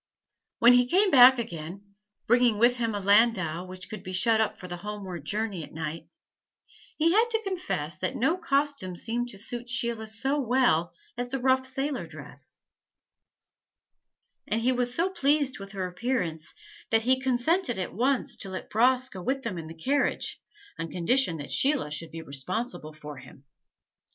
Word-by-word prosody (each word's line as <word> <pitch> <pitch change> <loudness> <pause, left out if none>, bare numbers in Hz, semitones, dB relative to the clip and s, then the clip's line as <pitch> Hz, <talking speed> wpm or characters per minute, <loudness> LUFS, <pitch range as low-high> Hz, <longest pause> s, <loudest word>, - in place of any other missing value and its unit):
When 240 +1 +7
he 245 0 +4
came 380 +7 +3
back 260 0 +8
again, 200 -2 -7 0.3
bringing 240 -2 +4
with 240 +3 +4
him 230 -3 -1
a - - -2
landau 195 -5 +3
which 185 0 -7
could 215 +1 -8
be 185 - -7
shut 220 +4 +3
up 220 - -1
for 180 - -8
the 175 -1 -6
homeward 195 -2 -7
journey 205 -5 -2
at - - -12
night, 160 0 -5 0.9
he 325 +2 +3
had 445 +5 +3
to 450 -1 0
confess 350 - -3
that 185 - -2
no 275 +8 +2
costume 280 - -1
seemed 240 +5 -2
to 205 - -7
suit 240 +4 -5
Sheila 235 -3 -1
so 265 +7 -1
well 245 - +2 0.3
as 245 - -2
the 265 +2 -3
rough 260 0 +2
sailor 265 - -2
dress; 155 +1 -9 1.9
and 225 +2 0
he 250 +3 +2
was 245 -1 0
so 340 +8 0
pleased 285 - +2
with 195 +1 -9
her 190 -2 -3
appearance 180 -5 -2 0.3
that 225 0 +2
he 260 +2 +3
consented 260 - +2
at 185 - -3
once 255 +5 +1
to 195 - -4
let 190 - -7
Bras 255 +3 +3
go 190 -8 -8
with 265 +7 -2
them 185 -7 -4
in 160 - -8
the 165 +1 -10
carriage, 275 - -1 0.4
on 165 - -4
condition 180 +1 +2
that 145 - -7
Sheila 275 - +2
should 160 +2 -2
be 165 +1 -8
responsible 155 - -3
for 150 -1 -9
him. 130 +1 -14
230 Hz, 175 wpm, -27 LUFS, 180-260 Hz, 1.9 s, back